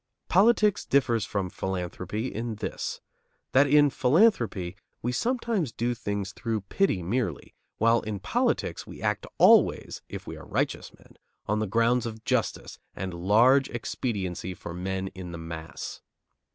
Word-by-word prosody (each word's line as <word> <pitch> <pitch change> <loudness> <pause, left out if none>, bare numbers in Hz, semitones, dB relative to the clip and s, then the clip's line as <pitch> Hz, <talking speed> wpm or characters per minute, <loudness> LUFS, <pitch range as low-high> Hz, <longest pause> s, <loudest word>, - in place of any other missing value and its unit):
Politics 210 +2 +4
differs 120 -6 +2
from 95 -2 -2
philanthropy 95 +3 -3
in 115 0 -3
this: 105 - -4 0.5
that 140 +2 +5
in 145 0 +5
philanthropy 125 - +2 0.3
we 120 - 0
sometimes 230 - 0
do 120 +2 -1
things 100 -4 -3
through 110 0 -3
pity 95 - 0
merely, 115 +8 -2 0.2
while 115 +1 +4
in 105 -1 -4
politics 90 -2 -1
we - - -10
act - - -1
always, - - +4
if - - -7
we - - -6
are - - -11
righteous - - -1
men, - - -21 0.3
on 105 +1 0
grounds 115 +3 +2
of 110 0 -8
justice 125 -7 -1 0.2
and 95 -1 -4
large 115 +10 +4
expediency 95 -7 -3
for 85 - -8
men 95 +2 -3
in 90 -2 -8
the - - -5
mass. 80 0 -7
110 Hz, 140 wpm, -27 LUFS, 95-130 Hz, 0.5 s, that